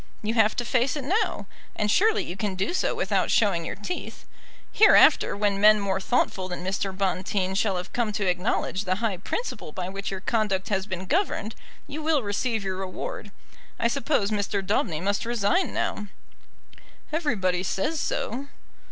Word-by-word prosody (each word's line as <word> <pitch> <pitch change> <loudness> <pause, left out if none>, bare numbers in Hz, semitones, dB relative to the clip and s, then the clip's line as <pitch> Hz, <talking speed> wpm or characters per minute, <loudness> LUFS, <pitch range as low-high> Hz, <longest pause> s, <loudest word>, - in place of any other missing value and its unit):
You 215 +2 0
have 220 -2 +3
to 240 - -2
face 255 +2 +1
it 290 - -4
now, 390 - 0 0.3
and 210 0 0
surely 430 - +3
you 175 - -6
can 195 -1 -2
do 195 - -1
so - - 0
without - - 0
showing 195 -6 +2
your - - -4
teeth. 210 - -6 0.5
Hereafter, 430 - +6
when 200 -1 +1
men 215 0 +7
more 195 -1 -1
thoughtful 190 -4 0
than 180 -1 -5
Mr. 195 +1 -1
Bonteen 190 0 -1
shall 195 -1 +1
have 180 - -6
come 235 -3 0
to 205 -1 -1
acknowledge 185 +2 0
the 185 0 +1
high 210 -2 -1
principle 460 - -4
by 185 -3 -4
which 195 +1 -4
your 195 - -4
conduct 210 -4 0
has 195 -1 -1
been 185 -2 -4
governed, 260 - 0 0.3
you 300 +2 -6
will 305 -4 +2
receive 215 +2 -1
your 190 -1 -3
reward. 190 +2 -5 0.5
I 230 - +3
suppose 250 -5 0
Mr. 205 -1 -1
Daubeny 180 -5 0
must 200 +2 0
resign 235 - +1
now." 210 - -2 1.1
"Everybody 200 - 0
says 195 - -1
so." 265 +2 -2
205 Hz, 170 wpm, -26 LUFS, 190-240 Hz, 1.1 s, men